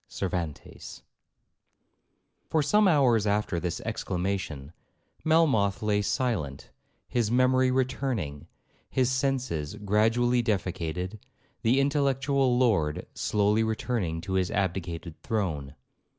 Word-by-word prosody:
CERVANTES 85 Hz, -5 st, -5 dB, 1.5 s
For 155 Hz, -2 st, +2 dB
some 210 Hz, +7 st, +4 dB
hours 125 Hz, -, +4 dB
after 100 Hz, -4 st, 0 dB
this 85 Hz, -1 st, -3 dB
exclamation, 90 Hz, -6 st, -3 dB, 0.5 s
Melmoth 130 Hz, -10 st, +3 dB
lay 105 Hz, -1 st, +2 dB
silent, 100 Hz, -, -2 dB, 0.4 s
his 120 Hz, -4 st, 0 dB
memory 130 Hz, +1 st, +3 dB
returning,—his 130 Hz, -, -2 dB
senses 130 Hz, -, -1 dB
gradually 115 Hz, +4 st, +2 dB
defecated,—the 95 Hz, +4 st, -2 dB
intellectual 135 Hz, -2 st, +2 dB
lord 95 Hz, -12 st, +1 dB
slowly 105 Hz, +1 st, +1 dB
returning 110 Hz, -7 st, -2 dB
to 95 Hz, -, -5 dB
his 95 Hz, -1 st, +1 dB
abdicated 85 Hz, -4 st, -3 dB
throne. 80 Hz, -11 st, -2 dB
105 Hz, 90 wpm, -27 LUFS, 90-130 Hz, 1.5 s, some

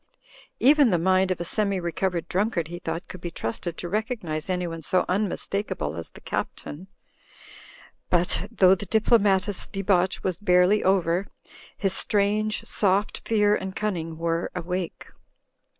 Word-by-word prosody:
Even 285 Hz, 0 st, +6 dB
the 180 Hz, -, +3 dB
mind 185 Hz, +2 st, +2 dB
of 185 Hz, -, -1 dB
a -, -, -2 dB
semi 200 Hz, +1 st, 0 dB
recovered 175 Hz, 0 st, -2 dB
drunkard, 185 Hz, -4 st, 0 dB
he 175 Hz, 0 st, -6 dB
thought, 175 Hz, -1 st, -4 dB
could 185 Hz, -, -10 dB
be 175 Hz, -, -4 dB
trusted 165 Hz, +5 st, -4 dB
to 175 Hz, -, -4 dB
recognise 200 Hz, -, -3 dB
anyone 175 Hz, -3 st, -2 dB
so 180 Hz, +5 st, +1 dB
unmistakable 195 Hz, -, -2 dB
as 85 Hz, 0 st, -6 dB
the -, -, -15 dB
Captain. 170 Hz, +6 st, -5 dB, 1.2 s
But, 175 Hz, +1 st, +1 dB
though 185 Hz, -1 st, +5 dB
the 195 Hz, +1 st, -3 dB
diplomatist's 205 Hz, -2 st, +2 dB
debauch 190 Hz, -2 st, 0 dB
was 185 Hz, -2 st, -2 dB
barely 180 Hz, +1 st, +4 dB
over, 185 Hz, 0 st, +2 dB, 0.5 s
his 195 Hz, -2 st, 0 dB
strange, 210 Hz, +2 st, +1 dB
soft 200 Hz, +1 st, 0 dB
fear 210 Hz, -2 st, +3 dB
and 190 Hz, 0 st, -5 dB
cunning 165 Hz, -6 st, -3 dB
were 165 Hz, 0 st, -1 dB
awake. 180 Hz, 0 st, -4 dB
185 Hz, 140 wpm, -25 LUFS, 175-205 Hz, 1.2 s, Even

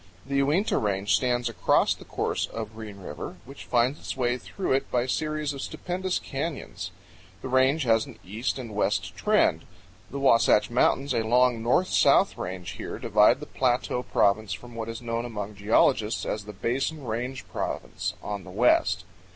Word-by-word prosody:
The 140 Hz, +1 st, -1 dB
Uinta 155 Hz, +10 st, +2 dB
Range 100 Hz, -1 st, +1 dB
stands 120 Hz, +1 st, +1 dB
across 115 Hz, -, +2 dB
the -, -, -13 dB
course -, -, -1 dB
of 110 Hz, -1 st, -6 dB
Green 110 Hz, -2 st, -8 dB
River, 95 Hz, -1 st, -7 dB
which 140 Hz, +2 st, -11 dB
finds 125 Hz, +4 st, +1 dB
its -, -, -6 dB
way 125 Hz, -1 st, +1 dB
through 190 Hz, -, -4 dB
it 135 Hz, +1 st, 0 dB
by 125 Hz, -1 st, +1 dB
series 155 Hz, +2 st, -1 dB
of 140 Hz, -, -6 dB
stupendous 185 Hz, +4 st, -2 dB
canyons. 135 Hz, -, -5 dB, 0.5 s
The -, -, -3 dB
range 130 Hz, +4 st, +3 dB
has 115 Hz, -2 st, +2 dB
an -, -, -12 dB
east 110 Hz, +9 st, -2 dB
and 120 Hz, -5 st, -7 dB
west 100 Hz, -3 st, 0 dB
trend. 95 Hz, -, +2 dB, 0.5 s
The 140 Hz, -, -6 dB
Wasatch 115 Hz, -5 st, +4 dB
Mountains, 130 Hz, +3 st, +2 dB
a -, -, +2 dB
long 120 Hz, +1 st, +3 dB
north 125 Hz, +11 st, +2 dB
and -, -, 0 dB
south -, -, +5 dB
range, 90 Hz, 0 st, -5 dB
here -, -, -6 dB
divide -, -, +4 dB
the -, -, -5 dB
Plateau 125 Hz, -1 st, 0 dB
Province 105 Hz, -3 st, +1 dB
from 120 Hz, +5 st, -9 dB
what 115 Hz, 0 st, -5 dB
is 115 Hz, +1 st, -6 dB
known 115 Hz, 0 st, -2 dB
among 105 Hz, -3 st, -5 dB
geologists 105 Hz, +1 st, +2 dB
as 105 Hz, -1 st, -3 dB
the 105 Hz, -, -7 dB
Basin 135 Hz, +8 st, -2 dB
Range 125 Hz, +3 st, -4 dB
Province, -, -, -3 dB
on 100 Hz, -2 st, -4 dB
the 95 Hz, -, -11 dB
west. 95 Hz, -3 st, +3 dB
120 Hz, 175 wpm, -26 LUFS, 105-135 Hz, 0.5 s, south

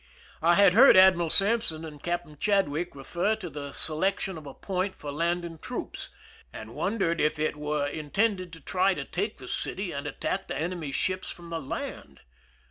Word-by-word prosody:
I 170 Hz, +2 st, +5 dB
had 200 Hz, -2 st, +6 dB
heard 245 Hz, 0 st, +8 dB
Admiral 185 Hz, -3 st, +6 dB
Sampson 195 Hz, -5 st, +1 dB
and 150 Hz, -2 st, -10 dB
Captain 175 Hz, -3 st, -3 dB
Chad 200 Hz, +4 st, +2 dB
wick 155 Hz, +4 st, -3 dB
refer 175 Hz, +10 st, 0 dB
to 185 Hz, -6 st, -7 dB
the 140 Hz, 0 st, -6 dB
selection 190 Hz, +6 st, -1 dB
of 155 Hz, -3 st, -9 dB
a 135 Hz, -, -8 dB
point 190 Hz, 0 st, -2 dB
for 145 Hz, -, -6 dB
landing 170 Hz, +2 st, -1 dB
troops, -, -, -5 dB, 0.4 s
and 110 Hz, -, -9 dB
wondered 190 Hz, -, 0 dB
if 150 Hz, 0 st, +2 dB
it 155 Hz, 0 st, 0 dB
were 150 Hz, -1 st, -1 dB
intended 185 Hz, +6 st, -1 dB
to 165 Hz, -, -10 dB
try 185 Hz, +5 st, +2 dB
to 140 Hz, -, -4 dB
take -, -, -2 dB
the -, -, -10 dB
city -, -, -2 dB
and -, -, -4 dB
attack -, -, -3 dB
the -, -, -3 dB
enemy's 160 Hz, -3 st, -3 dB
ships 185 Hz, 0 st, -1 dB
from 170 Hz, -1 st, -9 dB
the 165 Hz, -1 st, -3 dB
land. 130 Hz, -, -6 dB
170 Hz, 185 wpm, -28 LUFS, 150-190 Hz, 0.4 s, heard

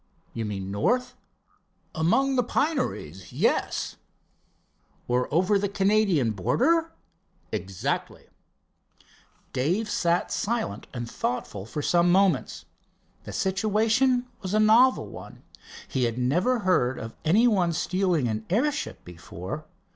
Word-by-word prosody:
"You 115 Hz, -, -3 dB
mean 100 Hz, -2 st, -4 dB
north?" 250 Hz, -, 0 dB, 0.8 s
"Among 265 Hz, +13 st, +2 dB
the 250 Hz, -, +4 dB
pineries, 245 Hz, -, -2 dB
yes." -, -, 0 dB, 1.1 s
"Or 125 Hz, +1 st, 0 dB
over 185 Hz, +6 st, +3 dB
the 200 Hz, 0 st, -1 dB
Canadian 195 Hz, -, +2 dB
border?" 325 Hz, -, +1 dB, 0.6 s
"Exactly." 95 Hz, -1 st, -3 dB, 1.3 s
Dave 180 Hz, -, 0 dB
sat 175 Hz, -4 st, 0 dB
silent 220 Hz, -, -2 dB
and 120 Hz, -2 st, -5 dB
thoughtful 110 Hz, -4 st, -4 dB
for 150 Hz, +5 st, -4 dB
some 175 Hz, +2 st, +3 dB
moments. 185 Hz, -6 st, +2 dB, 0.6 s
The -, -, -7 dB
situation 220 Hz, +6 st, +1 dB, 0.2 s
was 190 Hz, +1 st, -2 dB
a -, -, +4 dB
novel 230 Hz, +5 st, +5 dB
one. -, -, -11 dB, 0.4 s
He 130 Hz, -2 st, 0 dB
had 115 Hz, 0 st, -2 dB
never 180 Hz, -, +1 dB
heard 130 Hz, -10 st, +2 dB
of 115 Hz, 0 st, -7 dB
any 205 Hz, +10 st, +4 dB
one 185 Hz, -7 st, +2 dB
stealing 175 Hz, -3 st, 0 dB
an 110 Hz, -1 st, -2 dB
airship 285 Hz, -, -1 dB
before. 90 Hz, -, -8 dB
180 Hz, 115 wpm, -26 LUFS, -, 1.3 s, novel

